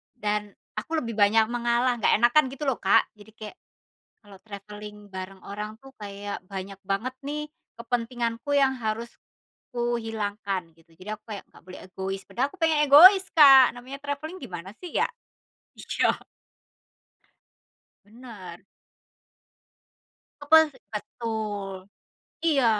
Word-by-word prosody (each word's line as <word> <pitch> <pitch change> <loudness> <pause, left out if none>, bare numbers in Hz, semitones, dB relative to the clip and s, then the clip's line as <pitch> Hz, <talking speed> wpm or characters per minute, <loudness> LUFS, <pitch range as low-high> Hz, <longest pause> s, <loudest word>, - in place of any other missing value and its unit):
Dan, 210 -2 -2 0.2
aku 325 0 -3
lebih 230 -5 -5
banyak 215 +1 +4
mengalah 240 +1 +1
nggak - - +4
enakan 240 +7 +5
gitu 275 +2 -7
loh, 265 - +2
Kak. 195 - +4
Jadi, 210 +1 -16
kayak 215 +7 -9 0.7
kalau 205 -2 -15
travelling 210 0 -10
bareng 190 0 -8
orang 210 +2 -6
tuh 270 0 -15
kayak 205 -1 -7
banyak 195 0 -6
banget 200 +6 -2
nih 300 +1 -4 0.3
kepentinganku 235 +1 -3
yang 270 -1 +3
harus 225 0 -3 0.6
kuhilangkan, 215 -6 -3
gitu. 165 0 -25
Jadi, 185 - -12
aku 215 0 -18
kayak 200 - -7
nggak - - -18
boleh 185 +1 -10
egois, 190 +1 -5
padahal 265 +3 -1
aku - - -14
pengen 320 -2 +3
egois, 370 +7 +9
Kak. 270 -4 +9
Namanya 255 +3 -9
travelling 290 +5 -5
gimana 175 +1 -7
sih, 360 - -8
ya? - - +2 0.7
Syok. - - -1 1.8
Benar. 210 -6 -11 1.8
Kepuas 320 +2 +6 0.2
betul, 210 -2 -4 0.7
iya. 285 -7 +3
225 Hz, 125 wpm, -26 LUFS, 205-265 Hz, 1.8 s, egois